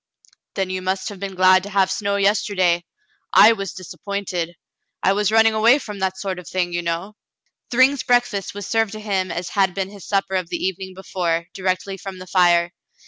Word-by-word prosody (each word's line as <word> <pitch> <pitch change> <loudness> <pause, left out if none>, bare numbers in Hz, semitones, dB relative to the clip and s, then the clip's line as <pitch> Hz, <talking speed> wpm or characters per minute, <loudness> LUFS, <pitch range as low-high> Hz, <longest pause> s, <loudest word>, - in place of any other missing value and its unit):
"Then 190 -1 -1
you 185 0 -3
must 190 +2 -2
have 200 -2 -10
been 195 -1 -5
glad 185 0 +5
to 200 - -8
have 190 -1 +2
snow 200 0 -1
yester 200 +1 +1
day. 175 -2 +2 0.5
I 225 - +8
was 195 -5 -5
disappointed. 180 -1 -5 0.5
I 195 - +4
was 210 0 +1
running 225 0 +5
away 225 +5 +5
from 210 -8 -8
that 190 0 -1
sort 190 -2 -4
of 180 - -11
thing, 180 -2 -1
you 175 - -1
know." 170 +5 -4 0.5
Thryng's 260 +3 +3
breakfast 245 -6 0
was 205 -1 -6
served 225 -1 0
to 215 - -6
him 195 -4 -2
as 175 +1 -4
had 190 -3 +1
been 195 0 -3
his 200 -3 -12
supper 195 -1 0
of 185 -3 -1
the - - -2
evening 190 0 -4
before, 170 -3 -2
directly 190 +1 -2
from 195 0 -8
the 185 - -9
fire. 175 -2 +3
190 Hz, 200 wpm, -21 LUFS, 185-205 Hz, 0.5 s, I